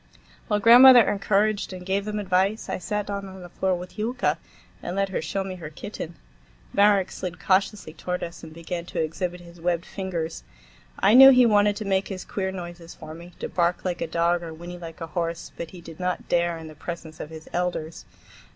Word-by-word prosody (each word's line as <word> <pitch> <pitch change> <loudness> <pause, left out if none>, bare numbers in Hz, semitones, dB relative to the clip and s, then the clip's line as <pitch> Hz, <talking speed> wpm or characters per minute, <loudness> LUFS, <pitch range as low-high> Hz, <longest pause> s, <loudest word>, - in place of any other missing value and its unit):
While 210 -2 +1
grandmother 245 +2 +9
encouraged 205 0 +1
and 180 -1 -8
gave 195 +1 0
them 210 0 -3
advice, 195 +2 0
I - - -2
sat 210 +2 -2
down 200 -1 -4
on 190 -1 -10
the 175 - -10
floor 190 +1 0
with 180 +4 -9
Yulka 240 +3 0 0.4
and 175 - -4
let 195 0 0
her 190 - -2
show 195 - -2
me 190 -1 -5
her 160 -4 -7
kitten. 170 0 -7 0.6
Marek 200 -2 +4
slid 180 -2 -6
cautiously 195 -3 0
toward 180 +2 -4
us 170 0 -7
and 160 - -10
began 170 +1 -6
to - - -4
exhibit 175 +3 -2
his 170 -1 -14
webbed 170 0 0
fingers. 175 -4 -4 0.5
I 200 +2 +4
knew 270 +2 +11
he 250 -2 +7
wanted 205 -2 +4
to 210 - -5
make 195 -1 +1
his 190 -2 -6
queer 190 -1 -3
noises 175 -2 -8
for 155 -1 -9
me—to 170 +2 -8
bark 175 +1 0
like 180 -2 -2
a - - -1
dog 170 +1 +1
or 165 -2 -7
whinny 175 +2 -9
like 165 -1 -9
a - - -2
horse,—but 165 0 -4
he 180 - -12
did 165 -1 -12
not 180 0 -2
dare 170 -1 +1
in 160 -1 -9
the 155 - -10
presence 160 0 -8
of 150 - -6
his 160 -1 -10
elders. 175 -2 -3
180 Hz, 205 wpm, -25 LUFS, 170-200 Hz, 0.6 s, knew